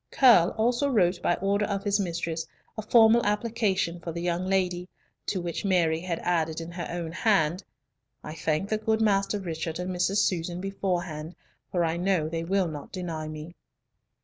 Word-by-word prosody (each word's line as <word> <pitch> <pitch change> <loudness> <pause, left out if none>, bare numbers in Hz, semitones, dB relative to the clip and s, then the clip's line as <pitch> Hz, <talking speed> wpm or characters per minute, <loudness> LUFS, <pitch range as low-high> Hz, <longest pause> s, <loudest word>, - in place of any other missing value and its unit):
Curll 230 -10 +6
also 245 +5 +2
wrote 180 -7 +2
by 175 - +2
order 200 +2 0
of 200 -1 -2
his 205 -1 +1
mistress 170 -3 -2 0.3
a 220 - -4
formal 225 +1 +5
application 210 -5 0
for 170 0 -5
the 170 +1 -5
young 175 +1 -1
lady, 180 -2 0 0.4
to 190 - -1
which 170 -1 -4
Mary 170 -5 +2
had 170 -1 -3
added 160 -2 0
in 165 +1 -7
her 175 0 -5
own 170 -2 -4
hand, 185 -2 +1 0.6
"I 155 - -6
thank 160 +4 -1
the 215 - 0
good 220 0 +1
Master 205 -1 +2
Richard 165 -3 -4
and 180 +1 -3
Mrs. 185 +3 +1
Susan 175 -1 -2
beforehand, 180 -4 -3 0.4
for 175 -2 +1
I 165 +1 -1
know 180 -3 +1
they 165 +1 -3
will 190 +1 +1
not 150 -3 -7
deny 165 -4 -4
me." 155 +2 -8
180 Hz, 175 wpm, -27 LUFS, 165-200 Hz, 0.6 s, Curll